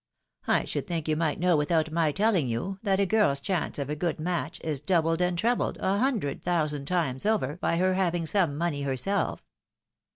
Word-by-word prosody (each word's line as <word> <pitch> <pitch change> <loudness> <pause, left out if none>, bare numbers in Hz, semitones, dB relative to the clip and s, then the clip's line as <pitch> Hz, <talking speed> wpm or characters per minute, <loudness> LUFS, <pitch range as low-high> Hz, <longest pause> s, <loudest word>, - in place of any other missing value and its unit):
I - - +2
should - - -4
think 165 -4 -3
you 155 - +2
might 155 -1 0
know 180 0 +3
without 155 +1 +1
my 160 -2 +2
telling 195 - +2
you, 155 +12 -3
that 195 -3 +1
a 200 - +3
girl's 195 -9 +2
chance 180 +4 -2
of 140 -2 -3
a 150 - -2
good 165 +1 -2
match 175 +2 -2
is 155 -4 -2
doubled 165 +1 +1
and 180 -1 +1
trebled 235 +6 0
a 195 +2 +1
hundred 225 - 0
thousand 150 -5 -1
times 160 -8 -1
over 205 -9 0
by 170 - 0
her 185 +1 +2
having 175 -3 0
some 165 -5 +1
money 160 -3 -1
her 135 -2 -1
self." 200 +11 -1
170 Hz, 200 wpm, -27 LUFS, 150-190 Hz, -, know